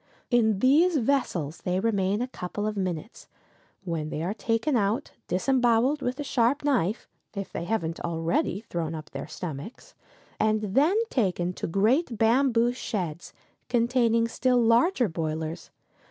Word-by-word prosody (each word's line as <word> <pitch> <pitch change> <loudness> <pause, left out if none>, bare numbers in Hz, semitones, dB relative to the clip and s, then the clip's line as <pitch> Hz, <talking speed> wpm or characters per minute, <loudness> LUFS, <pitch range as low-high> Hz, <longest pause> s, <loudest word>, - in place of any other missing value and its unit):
In 220 -4 +3
these 310 +6 +4
vessels 220 - 0
they 180 +1 -1
remain 200 0 +1
a - - -3
couple 205 -3 -5
of 215 0 -2
minutes, 185 +2 -4 0.6
when 165 -4 -3
they 155 - -3
are 185 +4 -1
taken 230 +5 0
out, 220 +5 0 0.2
disemboweled 245 +7 +2
with 250 +2 -2
a - - -2
sharp 260 +1 +1
knife, 240 - 0 0.3
if 195 -1 -5
they 170 - -4
haven't 170 -6 -2
already 170 +3 -1
thrown 165 -6 -4
up 155 -1 -9
their - - -6
stomachs, 180 - -7 0.5
and 215 -2 +1
then 310 - +4
taken 180 -6 0
to - - -4
great 225 - +1
bamboo 240 +1 +3
sheds 180 -9 -4 0.4
containing 235 -1 +2
still 250 +2 +1
larger 240 - +3
boilers. 160 -1 -4
220 Hz, 140 wpm, -27 LUFS, 180-250 Hz, 0.6 s, these